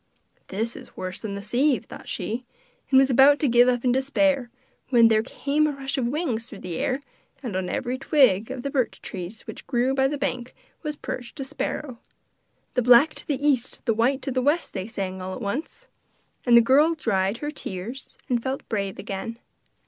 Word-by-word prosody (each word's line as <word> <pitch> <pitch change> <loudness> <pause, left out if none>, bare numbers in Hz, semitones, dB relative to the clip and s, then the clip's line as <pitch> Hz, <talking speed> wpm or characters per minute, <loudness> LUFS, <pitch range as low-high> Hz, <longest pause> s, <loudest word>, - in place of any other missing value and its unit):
'This 225 +4 -2
is - - -12
worse 185 0 -5
than 205 -3 -5
the 200 - -6
sieve,' 255 0 +1
thought - - -11
she, 235 +4 -3 0.5
and 265 - +5
was 265 0 +5
about 270 +3 +7
to 290 - +1
give 240 0 +5
up 245 0 +1
in 250 - +4
despair 270 0 +1 0.4
when 235 -3 +6
there 215 -1 +4
came 285 +6 0
a - - 0
rush 275 -1 -4
of 255 -3 0
wings 250 -5 -2
through 215 - -10
the 180 -3 -5
air, 270 +2 -1 0.4
and 230 -7 -4
on 185 -1 -1
every 255 0 -2
twig 255 -8 +3
of 260 -2 -5
the 280 - -3
birch 260 -4 0
trees 190 +3 -6
which - - -10
grew 250 +1 +1
by 265 0 +3
the 290 +1 -2
bank 255 -3 -3 0.3
was 300 -2 -4
perched 245 -1 -7
a - - -2
sparrow. 265 -1 -4 0.7
'The 250 - +2
black 250 +6 +6
to - - -6
the 290 0 0
east, 260 -4 0
the 230 - +3
white 250 +5 +1
to 275 - -2
the 255 0 0
west!' 295 +6 +1
they 190 0 -4
sang, 190 -4 -4
all 185 0 -4
at - - -7
once; 285 - -4 0.6
and 240 -1 +8
the - - +9
girl 290 +8 +4
dried 200 -7 0
her 295 +3 -4
tears 235 0 -7
and 240 -2 +1
felt 265 +2 -4
brave 200 -3 -2
again. 205 +4 -5
250 Hz, 205 wpm, -25 LUFS, 225-275 Hz, 0.7 s, the